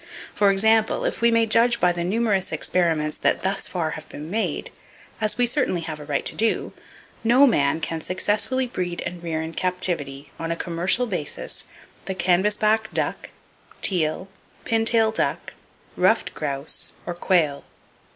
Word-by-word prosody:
For 205 -1 +3
example, 220 +3 +3
if - - -2
we 235 - +5
may 230 -1 +3
judge 235 +2 +3
by 180 - +4
the 175 0 -3
numerous 200 0 0
experiments 160 -4 0
that - - +1
thus 195 +1 -1
far 165 -4 -2
have 155 0 -8
been 150 +3 -8
made,—as 215 0 -4
we 245 - +4
certainly 240 - 0
have 160 -2 -5
a 150 - -9
right 145 -2 -1
to - - +1
do,—no 230 +3 +1
man 165 - +2
can 160 0 -3
successfully 210 +9 0
breed 180 -7 -4
and 175 0 -5
rear 160 -2 -2
in 160 +1 -6
captivity, 165 -7 -2
on 165 - -3
a 165 - 0
commercial 175 +8 0
basis, 180 -10 -4 0.4
the 190 - -3
canvasback 210 +4 +2
duck, - - -2 0.5
teal, 175 0 0 0.4
pintail 225 0 +3
duck, - - -2 0.4
ruffed - - +2
grouse 140 -1 -2
or 175 - -3
quail. 170 -5 +1
185 Hz, 150 wpm, -23 LUFS, 165-220 Hz, 0.5 s, we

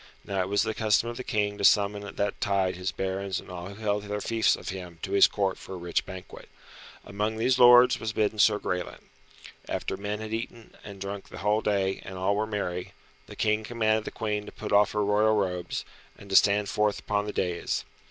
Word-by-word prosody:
Now 100 -1 -1
it 90 - -2
was 100 0 +2
the 110 - -2
custom 110 +1 +2
of 120 - -6
the 130 - -5
King 105 -2 -1
to - - -3
summon 100 0 +4
at 100 - -9
that 100 0 -1
tide 95 -3 +1
his 90 +1 -3
barons 95 0 -3
and - - -12
all 90 0 -6
who 100 - -9
held 105 -1 -1
their 105 0 -3
fiefs 115 +1 +2
of - - -8
him 90 -3 -7
to 95 - -4
his 100 0 +7
Court 100 -2 -1
for 95 - -8
a - - -6
rich 85 -1 -2
banquet. 95 -1 -10 0.6
Amongst 105 +2 -2
these 125 +3 +2
lords 125 0 +7
was 110 - -3
bidden 110 -1 0
Sir 105 0 +5
Graelent. 90 -3 -4 0.7
After - - -3
men 105 +1 -4
had 110 0 -6
eaten 115 0 -6
and 100 -1 -10
drunk 100 +1 -6
the - - -10
whole 105 +2 +1
day, 95 -3 0
and 95 - -8
all 95 +2 +1
were 110 +1 -1
merry, 90 -4 -4 0.3
the - - -10
King 110 0 +1
commanded 110 -1 0
the - - -3
Queen 105 -2 -3
to - - -8
put - - -7
off 105 0 +4
her 105 -1 +1
royal 105 +2 +3
robes, 90 -4 -2 0.3
and 100 -1 -13
to - - +1
stand 100 +1 +5
forth 105 +1 +1
upon 105 -1 -1
the - - -2
dais. 90 -2 -2
105 Hz, 225 wpm, -27 LUFS, 95-110 Hz, 0.7 s, his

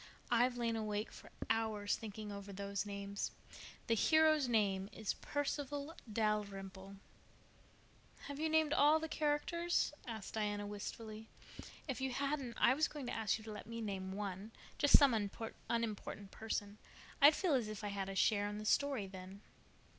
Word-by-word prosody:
I've 245 +1 +4
lain 230 -1 0
awake 215 -1 -2
for - - -12 0.2
hours 220 -2 +1
thinking 215 -1 -6
over 200 0 -7
those 200 +1 -3
names. 200 0 -3 0.6
The 230 - +2
hero's 310 +4 +5
name 200 -4 +2
is 215 0 -2
Perceval 290 +1 -3 0.2
Dalrymple." 200 -3 -2 1.3
"Have 285 0 -6
you 315 +1 +1
named 315 -1 +3
all 300 +1 +6
the 320 - -3
characters?" 315 +3 +1
asked 220 -4 -6
Diana 205 -1 -1
wistfully. 215 +2 -6 0.6
"If 265 -3 -3
you 265 -1 -1
hadn't 275 -3 -2
I 250 - +6
was 305 +3 +2
going 290 -3 -7
to 245 - -3
ask 220 -2 +1
you 220 - -12
to 220 - -7
let 210 - -8
me 230 0 -5
name 195 -4 -3
one—just 205 +7 +2
some 280 -4 +5
unimportant 215 -1 -3
person. 210 -2 -3 0.4
I'd 290 +2 +9
feel 365 -6 +1
as 245 -5 +2
if 215 0 -6
I 205 - -1
had 195 -1 -3
a 195 - -4
share 205 +1 +3
in 205 - -5
the 215 - -6
story 275 -2 +2
then." 190 +1 -9
220 Hz, 160 wpm, -37 LUFS, 205-270 Hz, 1.3 s, I'd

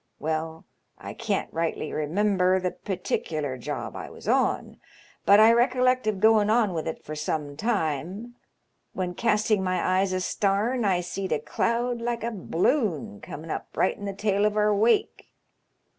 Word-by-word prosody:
Well, 160 +1 -3 0.3
I - - -8
can't 215 -4 -2
rightly 165 -1 -2
remember 185 +4 +2
the 180 -1 -1
particular 155 -7 -3
job 125 - -5
I - - -6
was - - -12
on, - - +1 0.5
but 200 +1 +8
I 220 +2 +7
recollect 255 0 +2
of 215 - +2
goin* 220 0 +4
on 220 -4 +3
with 160 -2 -3
it 160 - -5
for 155 - -6
some 150 -1 -3
time, 195 - -2 0.6
when 180 -1 -3
casting 215 -1 +1
my 185 0 +1
eyes 195 0 +1
astarn 200 +6 0
I 185 -3 +2
seed 185 +2 -5
a 155 - +3
cloud 235 +8 -1
like 235 -1 -2
a 235 - -1
b'loon 180 - -1
coming 160 +2 -8
up - - -6
right 185 - +2
in 205 - -8
the 200 - -3
tail 200 0 0
of 210 0 -2
our 210 0 +3
wake. 235 - +1
195 Hz, 160 wpm, -26 LUFS, 165-220 Hz, 0.6 s, but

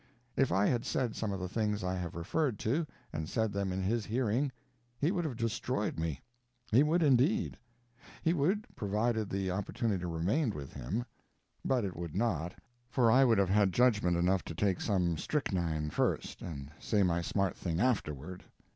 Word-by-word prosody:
If 135 - +2
I 95 +3 +3
had 120 0 +2
said 125 -4 -1
some 110 -2 -2
of 95 - -3
the 90 - -3
things 105 0 -1
I 90 0 0
have 90 -3 -4
referred 120 - 0
to, 150 +11 0 0.3
and 80 0 -3
said 110 -2 0
them 100 -1 -1
in 95 +1 -2
his 110 +4 +1
hearing, 120 +4 0 0.5
he 155 +5 +2
would 175 -4 -1
have 140 -6 -2
destroyed 115 -3 -1
me. 80 -4 -2 0.5
He 120 +5 +6
would, 160 +3 +3
indeed. 150 - +3 0.7
He 165 - +3
would, 180 +7 +1
provided 110 +1 0
the 95 -1 -1
opportunity 100 0 -1
remained 100 - 0
with 70 -2 -7
him. 90 - -3 0.6
But 125 -5 +1
it 95 - -4
would 85 -2 -6
not, 90 -6 0 0.3
for 120 -3 +4
I 130 +3 +6
would 115 -4 +4
have 100 -2 +3
had 100 -1 +3
judgment 105 -8 +3
enough 90 +2 +2
to 80 - -6
take 95 +1 +1
some 90 -6 +1
strychnine 85 - -1
first - - -1
and 70 -4 -6
say 105 -3 +2
my 85 -1 +2
smart 95 +1 0
thing 85 -2 -2
afterward. 90 - -1
105 Hz, 180 wpm, -32 LUFS, 90-125 Hz, 0.7 s, He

